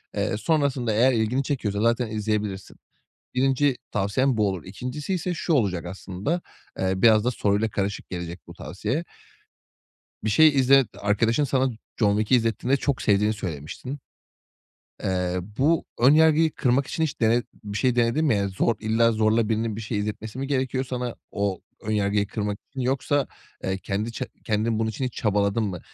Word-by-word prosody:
Eee, 105 +1 0
sonrasında 135 -5 +1
eğer 125 +4 +4
ilgini 115 +4 +1
çekiyorsa 105 -7 -2
zaten 115 +1 +2
izleyebilirsin. 105 -3 -3 0.6
1'inci 135 +1 +2 0.2
tavsiyem 110 +5 +1
bu 105 - +3
olur. 95 -4 -3
2'ncisiyse 150 - -3
şu 165 0 -1
olacak 95 - +1
aslında. 95 - -3 0.4
Eee, 95 0 +1
biraz 110 -2 +6
da 125 - +2
soruyla 105 0 +1
karışık 100 -1 -3
gelecek 85 -1 -5
bu 85 - -10
tavsiye 125 - -3 1.2
bir 110 - 0
şey 155 +10 +6
izlet 135 -2 +5
arkadaşın 115 +7 +2
sana 130 -1 +1 0.3
”John 105 -2 +3
Wick”i 110 +4 +3
izlettiğinde 115 +4 +1
çok 140 -2 -1
sevdiğini 105 +1 +3
söylemiştin. 95 - -6 1.0
Eee, 90 -1 0 0.2
bu 155 +4 +3 0.2
ön 130 +5 +7
yargıyı 160 0 +5
kırmak 130 +2 +1
için 160 - -3
hiç 155 -4 -2
dene 115 +1 +3 0.2
bir 105 0 -4
şey 125 +2 +2
denedin 120 +6 +2
mi, 130 -8 +3
yani? 100 0 0
Zor 100 +4 +1
illa 115 +1 +3
zorla 110 0 +2
birinin 110 -1 -1
bir - - -5
şey 105 0 -3
izletmesi 105 +3 -4
mi 135 - -2
gerekiyor 130 -1 0
sana 125 -2 -4 0.2
o 100 -2 -1 0.2
ön 110 - -2
yargıyı 100 -1 +1
kırmak 105 0 -3
için 135 - -6
yoksa, 135 +2 +1 0.4
eee, 95 0 -1
kendi 105 +4 -3
ç 120 - -5 0.2
kendin 110 +1 0
bunun 110 0 0
için 110 +5 -4
hiç 125 - -2
çabaladın 105 +1 +1
mı? 95 -5 -3
110 Hz, 165 wpm, -25 LUFS, 100-130 Hz, 1.2 s, ön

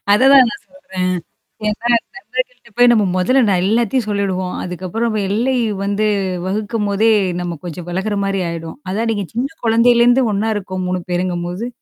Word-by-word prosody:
அத 205 - +4
தான் 270 -2 +8
நான் - - -7 0.8
சொல்றேன். 215 - -7
ஏன்னா, 230 +3 -3 0.3
நண்பர்கள்கிட்ட 475 - -5
போய் 245 0 +6
நம்ம 220 -3 +4
மொதல்ல 255 +9 +3
நான் 185 -2 +2
எல்லாத்தையும் 230 +2 +1
சொல்லிடுவோம். 190 -3 -1
அதுக்கப்பறம் 190 +6 -2
எல்லை 240 +6 +1 0.3
வந்து 205 +2 0 0.4
வகுக்கும்போதே 210 +1 0 0.3
நம்ம 175 -2 -4
கொஞ்சம் 175 0 -7
விலகுற 190 +4 -2
மாரி 195 0 -1
ஆயிடும். 165 +2 -6
அதான் 220 +4 -1
நீங்க 205 -3 -2
சின்ன 245 +4 -1 0.2
குழந்தையிலேருந்து 240 +2 +4
ஒண்ணா 210 +3 0
இருக்கோம் 185 -2 -4
3 180 0 -1
பேருங்கும்போது. 175 +3 -2
205 Hz, 145 wpm, -18 LUFS, 185-235 Hz, 0.8 s, தான்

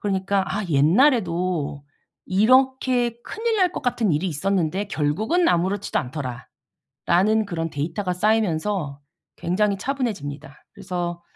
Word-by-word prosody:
그러니까 195 -1 0
'아 210 +1 -2
옛날에도 175 - +2 0.4
이렇게 250 +3 +2
큰일 445 +1 -2
날 365 -3 +2
것 - - -5
같은 235 -6 +1
일이 150 +5 0
있었는데 185 +2 0
결국은 215 - +1
아무렇지도 190 +4 0
않더라.'라는 125 -2 -7 0.8
그런 165 -4 -3
데이터가 165 +6 -3
쌓이면서 185 -6 0 0.4
굉장히 200 +3 0
차분해집니다. 195 - -4
그래서 175 -3 -4
190 Hz, 310 characters per minute, -23 LUFS, 160-220 Hz, 0.8 s, 옛날에도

